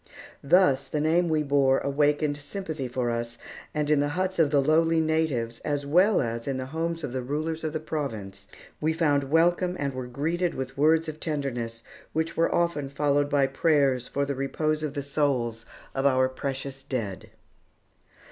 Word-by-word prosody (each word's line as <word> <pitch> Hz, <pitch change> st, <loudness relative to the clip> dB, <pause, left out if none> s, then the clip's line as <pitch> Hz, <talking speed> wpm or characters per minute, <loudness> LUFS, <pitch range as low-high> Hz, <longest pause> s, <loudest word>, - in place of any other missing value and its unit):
Thus 140 Hz, -4 st, +4 dB
the 150 Hz, -, -2 dB
name 165 Hz, +3 st, +2 dB
we 155 Hz, -1 st, +2 dB
bore 140 Hz, -2 st, +3 dB
awakened 145 Hz, +1 st, +1 dB
sympathy 155 Hz, -2 st, -5 dB
for 125 Hz, -1 st, -1 dB
us, 115 Hz, 0 st, -4 dB, 0.3 s
and 150 Hz, -1 st, -1 dB
in 150 Hz, -1 st, +3 dB
the 145 Hz, -, +2 dB
huts 185 Hz, -1 st, -1 dB
of 155 Hz, -3 st, +5 dB
the 145 Hz, -1 st, +3 dB
lowly 160 Hz, +3 st, +3 dB
natives 155 Hz, -8 st, 0 dB
as 145 Hz, -1 st, -2 dB
well 180 Hz, +8 st, +4 dB
as 115 Hz, +1 st, -4 dB
in 135 Hz, -1 st, -1 dB
the 130 Hz, -, -3 dB
homes 165 Hz, +4 st, -3 dB
of 125 Hz, -, -4 dB
the 130 Hz, -, -2 dB
rulers 155 Hz, +5 st, -3 dB
of 155 Hz, -, -1 dB
the 155 Hz, -, -2 dB
province, 110 Hz, -11 st, -5 dB, 0.3 s
we 155 Hz, +1 st, +1 dB
found 145 Hz, -4 st, +2 dB
welcome 175 Hz, +3 st, +3 dB
and 140 Hz, -1 st, -2 dB
were 130 Hz, -1 st, -5 dB
greeted 165 Hz, +7 st, -1 dB
with 130 Hz, 0 st, -5 dB
words 160 Hz, +3 st, +3 dB
of 155 Hz, 0 st, -6 dB
tenderness, 125 Hz, -8 st, -3 dB, 0.3 s
which 160 Hz, +1 st, -1 dB
were 165 Hz, -, +2 dB
often 170 Hz, -5 st, 0 dB
followed 145 Hz, 0 st, +1 dB
by 140 Hz, -1 st, +3 dB
prayers 135 Hz, -3 st, +2 dB
for 140 Hz, 0 st, -1 dB
the 140 Hz, -, -2 dB
repose 155 Hz, +3 st, -1 dB
of 150 Hz, -1 st, -3 dB
the 140 Hz, -, -2 dB
souls 130 Hz, -6 st, -1 dB, 0.3 s
of 135 Hz, +1 st, +2 dB
our 130 Hz, -1 st, +3 dB
precious 135 Hz, +1 st, -4 dB
dead. 115 Hz, -9 st, -4 dB
145 Hz, 180 wpm, -26 LUFS, 130-160 Hz, 0.3 s, of